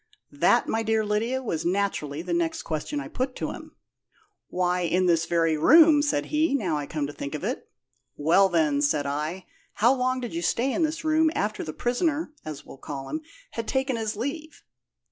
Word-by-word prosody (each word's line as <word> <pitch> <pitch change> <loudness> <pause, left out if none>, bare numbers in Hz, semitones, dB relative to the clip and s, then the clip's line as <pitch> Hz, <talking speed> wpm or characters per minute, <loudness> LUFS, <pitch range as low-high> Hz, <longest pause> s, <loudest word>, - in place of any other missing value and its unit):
"That, - - +3
my 225 - 0
dear 220 -1 +1
Lydia, 230 +5 -1
was 165 -10 -2
naturally 170 -5 -1
the 175 -1 -3
next 170 -1 -1
question 160 - -3
I - - -6
put 255 0 -3
to - - -3
him. - - -11 0.7
'Why, 180 0 0
in 180 +1 +1
this 165 -2 +2
very 165 -2 +2
room,' 305 - +7
said 290 - 0
he, 305 -1 +2
'now 185 - 0
I 145 -1 -3
come 150 -2 -2
to 145 - -6
think 140 +1 -5
of 150 - -6
it.' - - -3 0.5
'Well, 175 +6 +4
then,' 155 -5 +2
said 145 0 +1
I, 155 +6 -3 0.3
'how 235 +5 +4
long 255 0 0
did 245 +2 -5
you 335 - -2
stay 260 -4 +1
in - - -1
this 315 0 -1
room 315 0 +4
after 210 +1 -1
the 155 - -5
prisoner 295 - -1
(as 150 -2 -7
we'll - - -12
call 135 -2 -6
him) 310 - -3 0.3
had 230 -1 -5
taken 265 -1 0
his 220 -2 -2
leave?' 295 +7 -5
205 Hz, 200 wpm, -26 LUFS, 160-265 Hz, 0.7 s, room